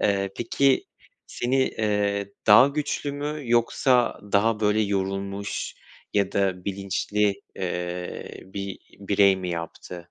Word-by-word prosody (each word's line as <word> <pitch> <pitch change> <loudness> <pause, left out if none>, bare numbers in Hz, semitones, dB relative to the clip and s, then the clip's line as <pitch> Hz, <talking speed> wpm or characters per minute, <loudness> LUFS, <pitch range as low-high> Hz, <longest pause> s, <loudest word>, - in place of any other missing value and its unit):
Eee, 100 -1 +1
peki, 130 +3 +2 0.4
seni, 125 +2 -1
eee, 100 -2 -1
daha 110 +6 +8
güçlü 145 0 -2
mü 150 +1 -4
yoksa 120 +1 +3
daha 105 +2 +3
böyle 105 0 +3
yorulmuş 100 0 -2 0.4
ya 100 -2 +2
da 95 -2 0
bilinçli, 100 +1 -1
eee, 90 -1 -4
bir 100 0 -6 0.2
birey 100 -1 +4
mi 90 -1 -5
yaptı? 85 +1 -6
100 Hz, 115 wpm, -25 LUFS, 95-115 Hz, 0.4 s, daha